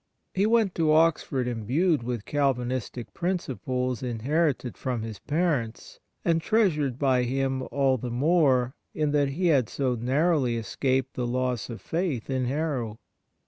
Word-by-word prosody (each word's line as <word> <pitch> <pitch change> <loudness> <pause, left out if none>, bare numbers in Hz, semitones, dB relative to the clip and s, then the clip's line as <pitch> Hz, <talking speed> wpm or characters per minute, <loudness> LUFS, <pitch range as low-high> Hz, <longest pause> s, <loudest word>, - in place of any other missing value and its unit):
He 195 +3 +2
went 220 -4 +3
to 160 -2 +2
Oxford 155 -5 +2
imbued 125 - +1
with 120 -2 -4
Calvinistic 130 -4 -1
principles 130 - -2
inherited 130 +2 0
from 125 -4 -3
his 110 -2 -6
parents, 145 -8 -2 0.3
and 165 -1 +2
treasured 155 - +1
by 130 -3 +2
him 130 +1 -1
all 135 -2 +2
the 125 - -4
more 130 -2 +3 0.2
in 150 -1 +1
that 145 -1 +2
he 170 +7 -2
had 130 -8 +3
so 130 -3 0
narrowly 130 +1 +1
escaped 130 +4 -1
the 125 -1 -2
loss 125 -2 -1
of 115 - -7
faith 160 - -2
in 130 -1 0
Harrow. 130 -5 -2
130 Hz, 145 wpm, -27 LUFS, 125-155 Hz, 0.3 s, went